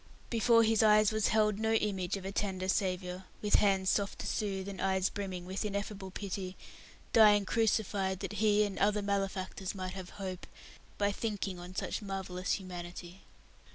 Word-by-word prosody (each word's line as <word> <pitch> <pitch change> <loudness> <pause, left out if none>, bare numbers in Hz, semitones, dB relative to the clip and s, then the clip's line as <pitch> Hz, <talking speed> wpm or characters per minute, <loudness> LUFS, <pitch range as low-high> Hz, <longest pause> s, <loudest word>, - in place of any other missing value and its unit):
Before 230 0 +5
his 225 0 +3
eyes 215 -1 +5
was 215 -1 +1
held 210 -1 +2
no 220 0 +1
image 195 -4 0
of 190 - -8
a 195 - -3
tender 190 -2 -2
Saviour 185 -1 -1 0.2
(with 210 - +4
hands 190 -2 +3
soft 200 -1 0
to - - -6
soothe, 195 -2 -2
and 195 -2 -6
eyes 190 0 +2
brimming 190 -3 -5
with 190 +2 -3
ineffable 200 -1 -4
pity) 190 -1 -5 0.6
dying 210 -2 +7
crucified 200 -4 +1
that - - -4
he 210 -1 +4
and 205 -2 -3
other 210 0 +2
malefactors 195 -1 -2
might 185 -1 -4
have 185 -2 -7
hope, 190 -2 -5 0.5
by 205 0 +2
thinking 200 -3 -3
on 180 +1 -9
such - - -2
marvellous 190 -2 -3
humanity. 175 -1 -7
195 Hz, 165 wpm, -32 LUFS, 185-210 Hz, 0.6 s, dying